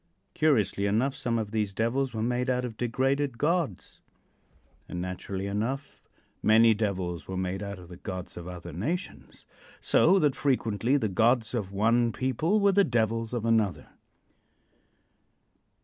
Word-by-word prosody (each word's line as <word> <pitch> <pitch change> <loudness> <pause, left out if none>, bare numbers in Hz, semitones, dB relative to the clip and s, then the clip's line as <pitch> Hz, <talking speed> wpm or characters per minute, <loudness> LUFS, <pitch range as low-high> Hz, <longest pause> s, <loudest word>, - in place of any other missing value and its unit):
Curiously 110 -9 +2
enough 115 +7 +1
some 125 -5 -1
of 110 -2 -3
these 105 -3 -1
devils 125 +4 0
were 110 -1 -3
made 125 +2 0
out 125 0 0
of 115 -3 -6
degraded 130 +3 0
gods, 150 - -1 0.9
and, 90 - -4
naturally 90 +2 -4
enough, 115 +8 -4 0.3
many 110 +1 +6
devils 95 -5 -3
were 95 - -4
made 95 +1 -2
out 100 -1 -5
of 90 -2 -12
the 90 0 -11
gods 95 -1 -6
of 85 0 -8
other 90 -2 -8
nations. 160 - -5 0.3
So 195 - +4
that 150 -7 +2
frequently 125 -1 +1
the 115 - 0
gods 115 +4 +2
of 105 -6 -3
one 115 +4 +2
people 130 - 0
were 200 -1 +4
the 200 +1 +4
devils 115 - 0
of 120 -2 -2
another. 105 -9 +1
115 Hz, 150 wpm, -28 LUFS, 100-130 Hz, 0.9 s, many